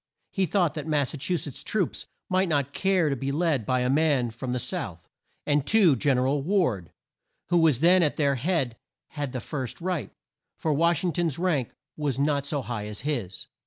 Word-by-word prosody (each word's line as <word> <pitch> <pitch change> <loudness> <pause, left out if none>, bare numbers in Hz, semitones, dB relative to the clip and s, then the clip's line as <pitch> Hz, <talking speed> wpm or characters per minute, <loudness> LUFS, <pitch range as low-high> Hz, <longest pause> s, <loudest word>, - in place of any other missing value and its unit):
He 190 -2 0
thought 175 -6 +2
that 150 -1 -5
Mas 145 -4 +1
sa 150 - -6
chu 175 +6 0
setts' 145 -3 -7
troops 200 -5 -2 0.2
might 185 -1 +1
not 140 -3 0
care 190 -4 +2
to - - 0
be 135 +1 -3
led 150 -6 0
by 130 -1 +2
a 125 - +1
man 140 -5 +2
from 125 +3 -5
the 125 - 0
south; 90 -7 -4 0.4
and, 145 -1 +2
too, 190 -3 +4
Gen 130 +2 +2
er 125 - +2
al 140 +2 +1
Ward, 135 - 0 0.6
who 175 -1 +4
was 155 -6 +3
then 180 +2 +6
at 150 -4 +1
their 140 -2 +2
head 135 -4 -1 0.3
had 145 -4 -4
the 125 - -3
first 130 0 -5
right, 170 - -2 0.5
for 155 - 0
Wash 170 +2 +2
ing 175 -3 0
ton's 165 -3 -1
rank 165 -9 0 0.3
was 145 -4 -2
not 140 0 +1
so 145 -2 -2
high 110 -4 -4
as 105 -1 -5
his. 120 -11 -3
145 Hz, 205 wpm, -26 LUFS, 130-170 Hz, 0.6 s, then